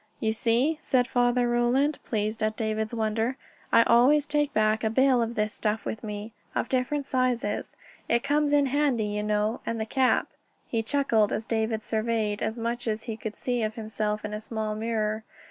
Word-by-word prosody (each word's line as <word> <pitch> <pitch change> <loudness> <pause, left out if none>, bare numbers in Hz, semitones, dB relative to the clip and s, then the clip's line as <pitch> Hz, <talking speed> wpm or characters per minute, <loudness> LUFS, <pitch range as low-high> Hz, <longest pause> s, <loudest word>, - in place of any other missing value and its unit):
"You 220 -1 0
see," 245 +8 +1
said 250 -5 +2
Father 245 0 +2
Roland, 240 +5 +2
pleased 215 0 -2
at 215 0 0
David's 220 -1 -1
wonder, 225 +3 0 0.3
"I 230 - +7
always 265 +6 +5
take 295 -1 0
back 215 +1 +2
a 220 - +2
bale 260 +1 +4
of 230 +1 -2
this 210 -1 0
stuff 215 +1 -2
with 220 - -4
me, 210 +1 -6 0.2
of - - -1
different 270 +2 0
sizes; 250 -5 -1 0.3
it 235 0 +2
comes 290 +1 +2
in 290 -1 +4
handy, 270 -5 +1
you 210 0 -2
know. 210 +2 0
And 230 0 -3
the 220 - -1
cap...." 255 +3 +2 0.4
He 230 - 0
chuckled 225 -4 +2
as 220 - -2
David 220 -1 -1
surveyed 220 -2 -1
as 220 - -2
much 235 +1 -3
as 220 0 -1
he 225 - -4
could 220 -1 -6
see 245 -2 -1
of 215 0 -2
himself 215 -1 -2
in 210 - -5
a 210 - -4
small 220 -1 -3
mirror. 215 0 -1
225 Hz, 190 wpm, -27 LUFS, 215-250 Hz, 0.4 s, I